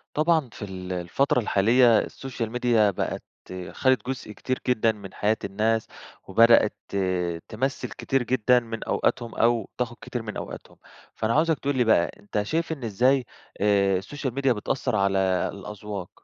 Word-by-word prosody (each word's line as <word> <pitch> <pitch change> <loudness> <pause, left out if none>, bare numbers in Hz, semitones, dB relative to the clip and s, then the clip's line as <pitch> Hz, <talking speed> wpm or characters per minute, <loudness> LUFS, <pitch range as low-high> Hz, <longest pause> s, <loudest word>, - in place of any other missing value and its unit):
طبعًا 155 -3 +2
في - - -11
ال 95 -2 -6
الفترة 90 +10 +1
الحالية 115 +2 +4
السوشيال 125 -3 -4
ميديا 120 -3 +3
بقت 95 - -3 0.5
خدت 130 -1 +1
جزء 130 -5 -4
كتير 130 +4 -3
جدًا 115 -2 +3
من 100 -3 -11
حياة 105 +1 +1
الناس، 110 +3 0 0.4
وبدأت 115 +2 +5
ت - - -5 0.5
تمثّل 130 +5 -2
كتير 135 -1 -1
جدًا 125 0 +3
من 115 -1 -6
أوقاتهم، 120 -2 -1
أو 115 -2 +1
تاخد 125 -1 -2
كتير 120 - -5
من 105 -1 -7
أوقاتهم، - - -8 0.4
فأنا 110 +1 0
عاوزك 160 0 +2
تقول 140 -1 -1
لي 125 - +3
بقى، 110 -6 +3
أنت 105 0 -2
شايف 160 +9 -1
إن 140 -6 -6
إزاي 125 +5 +2 0.4
آآ، 100 -1 +3
السوشيال 130 +5 -5
ميديا 135 -1 +2
بتأثر 120 +2 -2
على 100 -1 +2 0.3
الأذواق؟ 100 -1 -7
115 Hz, 155 wpm, -25 LUFS, 105-130 Hz, 0.5 s, وبدأت